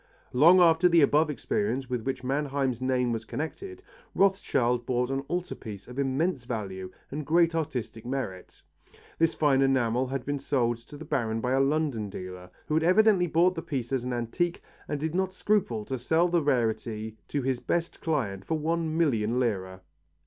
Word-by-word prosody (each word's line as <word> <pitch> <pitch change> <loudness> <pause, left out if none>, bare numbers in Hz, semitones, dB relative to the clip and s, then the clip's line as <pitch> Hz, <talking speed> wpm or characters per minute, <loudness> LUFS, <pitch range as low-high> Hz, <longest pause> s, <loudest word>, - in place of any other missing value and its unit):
Long 165 +8 +7
after 170 0 +5
the 170 -1 +5
above 150 +2 +3
experience 150 - -1
with 125 -2 -2
which 130 +1 -3
Mannheim's 135 -2 -1
name 125 -2 +1
was 115 -1 -3
connected, 370 - -6 0.3
Rothschild 125 -11 +2
bought 125 +1 0
an 135 - 0
altar 180 0 -2
piece 105 -4 -9
of 125 +2 -7
immense 140 +2 0
value 95 -6 -5 0.2
and 150 +2 -4
great 165 +3 +3
artistic 130 -8 -3
merit. 120 -8 -5 0.6
This 165 0 +2
fine 140 -3 +3
enamel 130 -2 +2
had 135 -1 -4
been 145 0 -2
sold 120 -5 0
to 120 +5 -13
the 160 - -9
Baron 115 -6 -1
by 125 +2 -1
a 135 - +3
London 135 -6 0
dealer, 90 -1 -8 0.2
who - - -3
had 160 +1 +2
evidently 185 0 +4
bought 170 +3 +3
the 165 - -5
piece 130 -7 -4
as 130 -2 0
an 125 - -3
antique 125 +9 -2 0.2
and 145 - -2
did 160 +2 -2
not 190 +1 -1
scruple 175 - 0
to 130 +1 -4
sell 160 +8 +2
the 170 -1 +2
rarity 110 -5 -1
to 140 -2 -2
his 130 -1 0
best 170 +4 -2
client 115 - -1
for 160 - -1
one 160 +1 -1
million 120 -7 +1
lire. 95 -6 -2
135 Hz, 180 wpm, -28 LUFS, 120-160 Hz, 0.6 s, Long